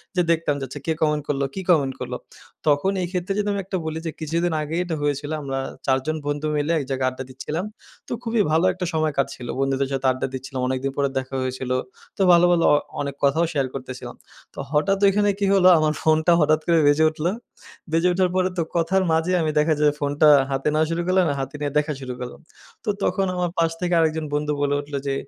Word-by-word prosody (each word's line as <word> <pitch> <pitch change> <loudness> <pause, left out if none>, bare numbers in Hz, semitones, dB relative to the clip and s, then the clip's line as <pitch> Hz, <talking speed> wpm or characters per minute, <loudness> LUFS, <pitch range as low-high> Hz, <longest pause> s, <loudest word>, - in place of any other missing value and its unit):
যে 180 - +3
দেখতাম 160 -3 +1
যে, - - -5
"আচ্ছা 140 +3 -8
কে 160 - +1
কমেন্ট 150 -2 +1
করলো, 140 -1 0
কি 190 - -3
কমেন্ট 140 -6 +3
করলো?" - - -4 0.5
তখন 145 +6 +3
এই 180 - -1
ক্ষেত্রে 185 +1 -2
যদি 210 - 0
আমি 200 - -2
একটা 190 0 -2
বলি 160 0 -3
যে - - -2
কিছুদিন 170 +3 0
আগেই 155 +3 -2
এটা 170 -2 -2
হয়েছিল। 145 0 -1
আমরা 135 -1 -3 0.3
৪ 130 -1 +3
জন 155 - -1
বন্ধু 145 +1 -1
মিলে 150 +2 0
এক - - -3
জায়গায় 130 -1 0
আড্ডা 130 +1 -7
দিচ্ছিলাম। 150 +8 -4 0.4
তো - - -11
খুবই 230 -2 +1
ভালো 165 +3 +3
একটা 180 0 -4
সময় 155 -1 +1
কাটছিল। 130 -3 -2
বন্ধুদের 135 0 +1
সাথে 135 0 -2
আড্ডা 130 - -2
দিচ্ছিলাম। 130 0 -5
অনেকদিন 130 +1 -1
পরে 140 -1 +1
দেখা 130 0 -3
হয়েছিল। 130 0 -3 0.5
তো - - -2
ভালো, 175 0 +6
ভালো 170 -1 +3
আ - - +6 0.3
অনেক 140 -1 -4
কথাও 145 +5 +3
শেয়ার 140 -3 0
করতেছিলাম। 130 -1 -7 0.4
তো - - -10
হঠাৎ 195 +6 +2
ঐখানে 205 +1 +3
কি 200 - +1
হলো 190 -2 +5
আমার 155 -1 +2
ফোনটা 160 +2 +3
হঠাৎ 155 0 +3
করে 170 -1 +4
বেজে 145 +2 +4
উঠল। 155 0 -6 0.7
বেজে 165 +2 +3
উঠার 185 0 +2
পরে 185 0 +2
তো 170 - +2
কথার 175 +3 +2
মাঝে 160 +3 +1
আমি 155 -1 0
দেখা 155 +1 +3
যায় 150 -1 +4
ফোনটা 145 +1 +3 0.2
হাতে 135 +2 -1
নেওয়া 155 +1 +3
শুরু 165 +1 -1
করলাম, 185 0 +3
আর - - -2
হাতে 135 - -6
নিয়ে 145 -1 -2
দেখা 150 +1 +1
শুরু 130 -1 -5
করলাম। 125 0 -7 0.4
তো - - -1
তখন 195 +2 +1
আমার 180 -1 0
পাশ 165 -1 +2
থেকে 180 0 0
আরেকজন 160 -1 +1
বন্ধু 150 0 0
বলে 145 0 +1
উঠল 145 0 -14
যে, 135 - 0
155 Hz, 225 wpm, -23 LUFS, 140-170 Hz, 0.7 s, ভালো